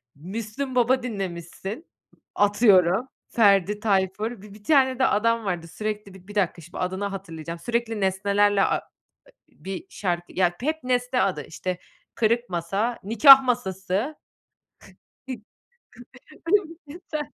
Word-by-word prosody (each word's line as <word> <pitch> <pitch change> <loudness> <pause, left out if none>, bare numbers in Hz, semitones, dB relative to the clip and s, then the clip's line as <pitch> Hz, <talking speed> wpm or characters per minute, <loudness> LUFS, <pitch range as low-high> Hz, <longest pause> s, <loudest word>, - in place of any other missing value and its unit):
Müslüm 215 - -5
Baba 250 +1 +3
dinlemişsin, 195 - -6 0.5
atıyorum, 205 0 +4 0.2
Ferdi 205 -3 +3
Tayfur, 205 +2 0
bi 205 -1 -13
bir 205 0 -16
tane 265 -2 +3
de 265 - +4
adam 230 +1 +1
vardı, 175 -4 -3
sürekli 210 +2 -5
Bi 185 -1 -16
bir 205 - -11
dakika, 185 -4 0
şimdi 170 +2 -11
adını 190 +2 -2
hatırlayacağım. 170 -4 -6
Sürekli 230 +2 -2
nesnelerle 200 +1 +2
a - - +2
e - - -8 0.8
bir 190 0 -5
şarkı 175 -3 -3
Ya, 180 -2 +2
hep 310 +3 -2
nesne 250 0 0
adı, 180 -7 -1
işte, 180 +2 -4 0.4
"Kırık 235 +2 +1
Masa, 195 +7 -2
Nikâh 250 +7 +8
Masası" 215 - -2 1.1
Ümit 235 -5 -6 1.4
Besen. 305 -1 -6
205 Hz, 125 wpm, -24 LUFS, 190-240 Hz, 1.4 s, Nikâh